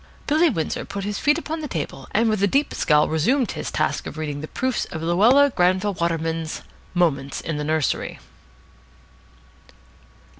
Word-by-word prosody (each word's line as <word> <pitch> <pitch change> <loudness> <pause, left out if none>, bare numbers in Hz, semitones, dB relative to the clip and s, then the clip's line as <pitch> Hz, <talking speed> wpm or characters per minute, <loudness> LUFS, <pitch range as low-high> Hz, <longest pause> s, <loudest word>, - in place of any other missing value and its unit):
Billy 315 +3 +4
Windsor 165 - -2
put 200 0 -6
his 205 0 -3
feet 295 +1 +3
upon 320 -1 -4
the 300 - -4
table, 145 - -5
and 225 +2 +2
with 215 -3 +1
a 200 - +4
deep 280 +8 +1
scowl 150 -1 +3
resumed 235 - +1
his - - -5
task - - -1
of - - -8
reading 150 -2 -4
the 155 - -6
proofs 255 +5 -1
of 160 -3 -7
Luella 235 +12 +5
Granville 185 +3 +2
Waterman's 165 -2 -2 0.3
"Moments 140 -6 +1
in 160 -2 -4
the 150 - -2
Nursery." 155 -1 -1
180 Hz, 160 wpm, -23 LUFS, 155-245 Hz, 0.3 s, Luella